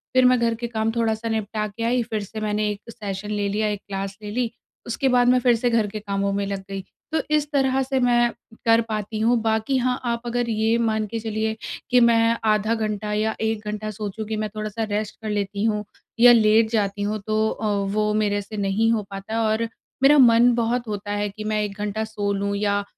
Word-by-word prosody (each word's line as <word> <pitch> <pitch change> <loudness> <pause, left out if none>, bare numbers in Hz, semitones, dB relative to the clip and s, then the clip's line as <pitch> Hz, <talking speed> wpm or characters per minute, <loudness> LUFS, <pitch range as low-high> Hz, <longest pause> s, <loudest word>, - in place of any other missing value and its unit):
फिर 255 0 +6
मैं 250 0 +5
घर 235 -1 +2
के 235 +1 -4
काम 225 -1 -1
थोड़ा-सा 225 -1 0
निपटा 215 -1 -2
के 215 +3 -7
आई, 245 +2 +2
फिर 220 -2 -3
से 215 +2 -7
मैंने 210 0 0
एक 210 +3 -7
सेशन 205 -2 -5
ले 205 -1 0
लिया 215 +2 0
एक 205 -1 -3
क्लास 195 -1 -4
ले 210 - -5
ली, 240 +1 -1 0.3
उसके 240 +3 -1
बाद 245 0 +4
मैं 250 0 +5
फिर 245 -1 +4
से 240 +2 0
घर 230 -3 +2
के 215 +1 -6
कामों 200 -1 -1
में 200 0 -1
लग 200 -1 -3
गई। 195 0 -4 0.3
तो 320 - +1
इस 300 -1 0
तरह 270 -2 +2
से 265 0 -1
मैं 240 -1 +3 0.4
कर 230 0 +5
पाती 215 0 -3
हूँ। 235 +2 +3
बाकी 220 +4 +1
हाँ, 250 0 0
आप 235 -1 -1
अगर 240 0 -1
ये 220 +1 +2
मान 220 -2 0
के 230 +2 -4
चलिए 220 0 -2 0.3
कि 250 - +5
मैं 230 -1 +4
आधा 215 +1 +2
घंटा 215 -1 -2
या 215 +1 0
1 220 -1 -1
घंटा 215 0 -3
सोचूँ 210 +1 -5
कि 220 - -2
मैं 215 0 -2
थोड़ा-सा 215 +1 -3
रेस्ट 210 0 -2
कर 220 - -4
लेती 205 0 -2
हूँ 210 -2 0 0.4
या 245 +1 +9
लेट 220 0 +4
जाती 205 -2 0
हूँ। 210 +1 -1
तो 215 0 +2
अ, 220 - -4 0.3
वो 210 0 +1
मेरे 205 -1 +1
से 210 +2 -9
नहीं 205 +3 +1
हो 220 -2 +1
पाता 195 +3 -3
और 220 +1 0 0.4
मेरा 290 +2 +7
मन 240 -2 +6
बहुत 235 +1 0
होता 205 -1 -4
है 205 0 -1
कि 215 +2 -8
मैं 215 0 0
1 205 -1 -5
घंटा 210 +1 -2
सो 210 -2 -2
लूँ 200 0 -1
या 205 0 0
220 Hz, 225 wpm, -23 LUFS, 210-230 Hz, 0.4 s, या